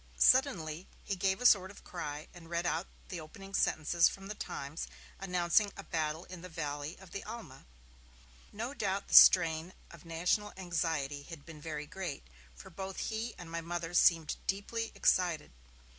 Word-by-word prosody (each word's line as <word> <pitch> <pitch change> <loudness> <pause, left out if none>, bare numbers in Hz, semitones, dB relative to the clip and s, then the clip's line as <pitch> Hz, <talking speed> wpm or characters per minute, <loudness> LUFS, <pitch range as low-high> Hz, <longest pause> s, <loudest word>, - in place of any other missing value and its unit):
Suddenly, 185 - +3 0.2
he 200 - -2
gave 190 +2 +1
a - - -3
sort 190 -5 +6
of 200 - -13
cry, 150 -3 -5
and 165 -2 -13
read 170 0 -1
out 175 +1 0 0.2
the 180 - -4
opening 195 +5 -11
sentences 170 -2 +3
from 195 0 -9
The - - -2
Times 145 -6 -5 0.3
announcing 180 +2 +2
a 200 - -7
battle 160 -1 -2
in 180 -2 -9
the 185 - -9
valley 150 -1 -4
of 190 -2 -15
the 200 - -5
Alma. 210 - -9 0.8
No 230 +6 -4
doubt 200 -6 -2
the - - -6
strain 165 -1 +8 0.2
of 170 -3 -13
national 180 +5 0
anxiety 165 -6 -1
had 145 0 -11
been 160 -3 -11
very 150 -1 -4
great, 180 -3 -5 0.3
for - - -12
both 190 -1 -6
he 225 +2 -3
and 170 -2 -9
my 170 0 -2
Mother 170 0 -4
seemed 165 -3 +4
deeply 225 +4 -2
excited. 175 - +2
175 Hz, 170 wpm, -33 LUFS, 160-195 Hz, 0.8 s, strain